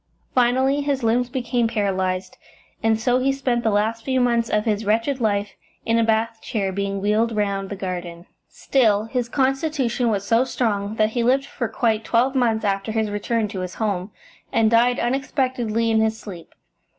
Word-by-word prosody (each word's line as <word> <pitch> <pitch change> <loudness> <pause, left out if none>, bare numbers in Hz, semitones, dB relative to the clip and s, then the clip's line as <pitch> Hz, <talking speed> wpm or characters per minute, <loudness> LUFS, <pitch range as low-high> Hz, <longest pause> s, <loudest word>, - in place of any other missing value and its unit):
Finally 260 +3 +2
his 280 -3 -1
limbs 240 +2 +1
became 245 -2 0
paralysed, 190 -4 -1 0.5
and 220 0 +2
so 245 +2 +2
he 270 +1 +2
spent 255 -3 -1
the 225 - +2
last 220 +2 0
few 260 0 0
months 235 -2 +1
of 210 0 +1
his 215 -1 0
wretched 230 +6 0
life 205 -2 0 0.3
in 230 0 +2
a - - +3
bath 225 0 0
chair, 200 -4 -2
being 200 +1 -2
wheeled 215 +3 +1
round 200 -2 -1
the 200 - -4
garden. 175 -2 -5 0.2
Still, 215 -6 +2
his 240 +1 -3
constitution 270 -2 0
was 200 -2 -1
so 230 +4 +3
strong 215 -5 -1
that 215 -1 +2
he 240 - -1
lived 260 +4 +2
for 245 -3 -4
quite 225 -1 0
twelve 245 +4 +2
months 230 -4 +1
after 195 +1 -1
his 220 -1 -1
return 215 +2 -1
to 195 -2 -5
his 185 0 -5
home, 200 -3 -2 0.4
and 225 -1 +3
died 240 +2 +4
unexpectedly 245 -3 0
in 220 - +3
his 220 0 0
sleep. 180 -5 -10
225 Hz, 180 wpm, -22 LUFS, 205-245 Hz, 0.5 s, died